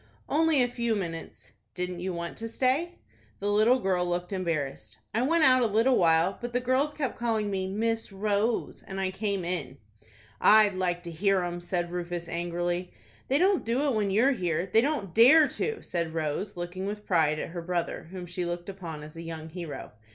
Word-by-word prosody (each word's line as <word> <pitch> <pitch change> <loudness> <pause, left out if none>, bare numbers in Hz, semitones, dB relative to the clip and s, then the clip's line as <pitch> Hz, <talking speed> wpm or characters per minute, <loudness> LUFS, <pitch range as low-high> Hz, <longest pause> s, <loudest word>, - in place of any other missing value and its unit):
"Only 310 -3 +3
a - - +1
few 235 -2 -1
minutes." 165 -5 -6 0.2
"Didn't 180 0 -3
you 185 +1 -3
want 170 -1 -5
to 225 - -4
stay?" 265 +9 0 0.4
The 205 +1 -1
little 215 +5 +4
girl 190 -7 0
looked 175 +2 -2
embarrassed. 145 - -3 0.2
"I 225 - +1
went 320 +5 +3
out 255 -2 +6
a 235 - +3
little 225 +5 +3
while, 165 +1 +3
but 240 0 -5
the 250 - +2
girls 260 +4 +1
kept 270 -6 -3
calling 220 -3 0
me 190 -1 -1
Miss 225 +3 -1
Rose, 210 +3 -1
and 195 0 -7
I 190 -1 0
came 200 -2 -2
in." 175 -6 -3 0.6
"I'd 215 -1 +6
like 175 -1 -1
to 170 - -6
hear 195 +3 +2
'em!" 175 0 -3
said 175 -1 -2
Rufus, 175 -1 -4
angrily. 175 +1 -2 0.4
"They 270 - +2
don't 375 +3 +3
do 240 +5 0
it 285 -3 +1
when 210 -3 +1
you 205 +4 +3
are 275 - +5
here. 175 - -1
They 210 +4 +3
don't 250 - -2
dare 290 +7 +7
to," 445 +9 -3
said 170 -2 -3
Rose, 165 +6 -2
looking 175 +2 -4
with 210 +1 -5
pride 160 -4 +2
at - - -4
her 170 +1 -5
brother, 175 0 -3
whom 185 -1 -7
she 175 +1 -4
looked 175 +1 -4
upon 170 -6 -7
as 155 +1 -11
a 165 - -7
young 160 -1 -7
hero. 170 -3 -7
190 Hz, 205 wpm, -28 LUFS, 175-230 Hz, 0.6 s, dare